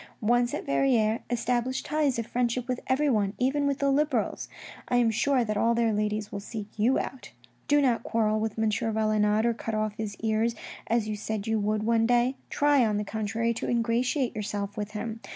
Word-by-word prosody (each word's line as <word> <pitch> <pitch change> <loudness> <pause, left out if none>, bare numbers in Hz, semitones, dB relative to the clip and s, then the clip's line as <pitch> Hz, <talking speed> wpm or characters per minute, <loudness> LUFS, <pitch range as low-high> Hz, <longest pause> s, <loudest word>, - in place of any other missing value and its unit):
Once 240 +2 +2
at - - -5
Verrieres, 220 - +2
establish 245 +1 -1
ties 295 -4 0
of 230 - -2
friendship 245 +1 -1
with 250 -1 -1
everyone, 260 -8 +2
even 280 +3 +1
with 280 -1 0
the 280 -1 +1
Liberals. 275 -5 0 0.4
I - - 0
am 240 -2 +4
sure 260 +3 +2
that 215 -2 -2
all 230 +2 +2
their 230 -1 +2
ladies 210 0 -1
will 200 - -4
seek 210 +1 -6
you 230 +5 +2
out. 265 - -5 0.2
" 120 0 -37
Do 290 0 +4
not 245 -4 +2
quarrel 215 -1 0
with 220 0 -3
M. 220 -1 +1
Valenod, 215 0 +1
or 235 - +2
cut 225 -1 -4
off 215 -1 -1
his 215 -2 -4
ears, 225 +1 +1 0.3
as 225 -1 +1
you 215 - -2
said 210 0 -4
you 225 -1 0
would 210 +1 0
one 225 0 +2
day. 245 +2 +2
Try, 290 -2 +3
on 215 -2 +1
the 210 - -1
contrary, 220 +2 -1
to - - -4
ingratiate 240 +2 0
yourself 205 -1 -3
with 210 0 -5
him. 220 +1 -4
225 Hz, 205 wpm, -27 LUFS, 215-245 Hz, 0.4 s, am